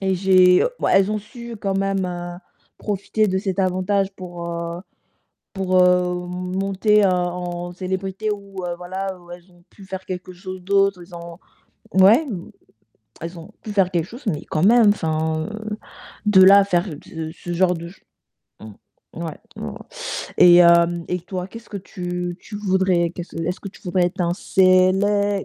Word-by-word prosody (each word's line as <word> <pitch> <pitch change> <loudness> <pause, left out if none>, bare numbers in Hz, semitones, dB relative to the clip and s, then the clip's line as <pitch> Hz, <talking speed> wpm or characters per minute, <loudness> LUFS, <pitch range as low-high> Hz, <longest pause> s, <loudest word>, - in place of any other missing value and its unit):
et 190 -1 +1
j'ai, 185 -1 +5 0.2
bah, - - +1
elles 195 +1 +4
ont 215 - -1
su 235 +2 -10
quand 195 -1 -1
même, 195 -1 0
heu, 175 0 -6 0.4
profiter 210 +1 -1
de 190 - 0
cet 190 -1 -2
avantage 190 +1 +1
pour, 175 -2 -7
heu, 170 0 -4 0.7
pour, 190 -1 -1
heu, 180 0 +3
monter, 195 +3 +1
heu, 195 - +5
en 175 -1 -3
célébrité 190 +3 -3
ou 200 -2 -6
heu, 175 -1 -3
voilà, 190 +1 -5
ou 175 0 -17
elles 175 +1 -12
ont 175 - -23
pu 200 - -16
faire 190 0 -7
quelque 185 0 -6
chose 185 0 -8
d'autre, 195 -1 +2
elles 175 0 -13
ont 170 0 -9 0.6
mouais, 200 +9 +6
mmh, 185 -7 -6 0.7
elles 170 +2 -7
ont 165 - -11
pu 215 - -6
faire 195 -2 +2
quelque 170 -2 -1
chose, 240 +4 -12
mais 155 -7 -2
quand 155 - -1
même, 230 0 +6
enfin, 160 -4 0
heu, 215 0 -6 0.5
de 200 -3 +6
là 195 +2 +9
à 200 - +4
faire 180 -2 +1 0.2
ce 160 -1 -6
ce 175 0 -6
genre 180 +1 +3
de 170 +1 -7
ch 190 - -18 0.6
mmh, 110 +9 -13
ouais. 160 -2 -6 0.2
Mmh - - -5
mh - - -9 0.6
et 175 -1 +8
hem, 170 0 +5
et 180 - -1
toi, 180 +1 -5
qu'est-ce 230 +3 -12
que 205 - -6
tu 180 -2 -5
tu 210 - -9
voudrais 190 -4 +1
qu'est-ce 175 0 -8
est-ce 175 +2 -2
que 200 - -7
tu 195 - -16
voudrais 180 0 +1
être 185 +2 -5
un 170 0 +1
célè 195 +2 +3
185 Hz, 180 wpm, -21 LUFS, 175-195 Hz, 0.7 s, là